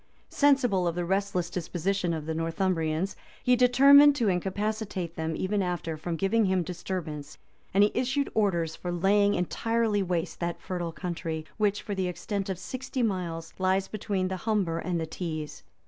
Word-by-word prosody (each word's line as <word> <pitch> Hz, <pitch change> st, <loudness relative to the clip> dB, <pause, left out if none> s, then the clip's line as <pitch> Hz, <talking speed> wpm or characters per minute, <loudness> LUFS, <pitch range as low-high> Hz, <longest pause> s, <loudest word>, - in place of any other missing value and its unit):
Sensible 250 Hz, -11 st, +3 dB
of 170 Hz, -, -1 dB
the 175 Hz, 0 st, -1 dB
restless 190 Hz, -2 st, -1 dB
disposition 180 Hz, +1 st, -1 dB
of 160 Hz, -2 st, -3 dB
the 160 Hz, -, -2 dB
Northumbrians, 165 Hz, +1 st, -1 dB, 0.3 s
he 250 Hz, -, +5 dB
determined 275 Hz, +4 st, +7 dB
to 235 Hz, -7 st, +1 dB
incapacitate 190 Hz, -1 st, -2 dB
them 160 Hz, 0 st, -2 dB
even 200 Hz, +2 st, 0 dB
after 175 Hz, -3 st, -2 dB
from 165 Hz, +2 st, -4 dB
giving 205 Hz, +6 st, +2 dB
him 185 Hz, -2 st, +2 dB
disturbance; 165 Hz, -4 st, -5 dB, 0.3 s
and 200 Hz, +2 st, +5 dB
he 205 Hz, -, +3 dB
issued 270 Hz, +2 st, 0 dB
orders 170 Hz, -7 st, +1 dB
for 175 Hz, -, -5 dB
laying 200 Hz, +3 st, +3 dB
entirely 225 Hz, +3 st, 0 dB
waste 175 Hz, -3 st, -2 dB
that 170 Hz, 0 st, -2 dB
fertile 175 Hz, -2 st, -4 dB
country, 160 Hz, -1 st, -4 dB
which, 205 Hz, -2 st, +1 dB
for 205 Hz, -, -4 dB
the 190 Hz, -2 st, -1 dB
extent 195 Hz, +2 st, -3 dB
of 190 Hz, -, -2 dB
sixty 255 Hz, +6 st, -4 dB
miles, 170 Hz, -6 st, -2 dB
lies 190 Hz, +1 st, +2 dB
between 200 Hz, -3 st, -2 dB
the 190 Hz, 0 st, -3 dB
Humber 190 Hz, -5 st, 0 dB
and 180 Hz, -2 st, -2 dB
the 160 Hz, -, -2 dB
Tees. 155 Hz, -2 st, -5 dB
185 Hz, 165 wpm, -28 LUFS, 170-210 Hz, 0.3 s, determined